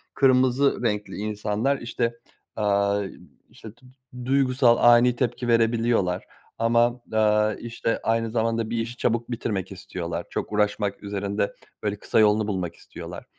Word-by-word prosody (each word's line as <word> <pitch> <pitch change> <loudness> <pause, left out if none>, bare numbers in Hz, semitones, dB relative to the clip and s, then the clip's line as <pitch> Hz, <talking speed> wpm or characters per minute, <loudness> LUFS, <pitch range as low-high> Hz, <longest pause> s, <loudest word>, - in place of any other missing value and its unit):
kırmızı 130 0 +3
renkli 105 -3 -1
insanlar, 105 +5 -1
işte, 120 0 -2 0.4
aaa, 100 -1 +1 0.5
işte, 110 - -12
du 125 +2 -23 0.4
duygusal, 130 -2 +3
ani 120 +1 +5
tepki 120 0 -2
verebiliyorlar 115 -5 +2 0.3
ama, 120 +1 +2
aaa, 105 0 +3
işte, 115 -1 -3
aynı 115 0 0
zamanda 115 -1 0
bir 115 - -2
işi 115 +1 -3
çabuk 120 0 -1
bitirmek 105 -5 -3
istiyorlar. 90 -2 -5
Çok - - -4
uğraşmak 105 -1 0
üzerinde, 100 0 -2 0.3
böyle, 105 -1 -1
kısa - - +1
yolunu 105 0 +4
bulmak 90 -5 -3
istiyorlar. - - -10
115 Hz, 130 wpm, -25 LUFS, 105-120 Hz, 0.5 s, ani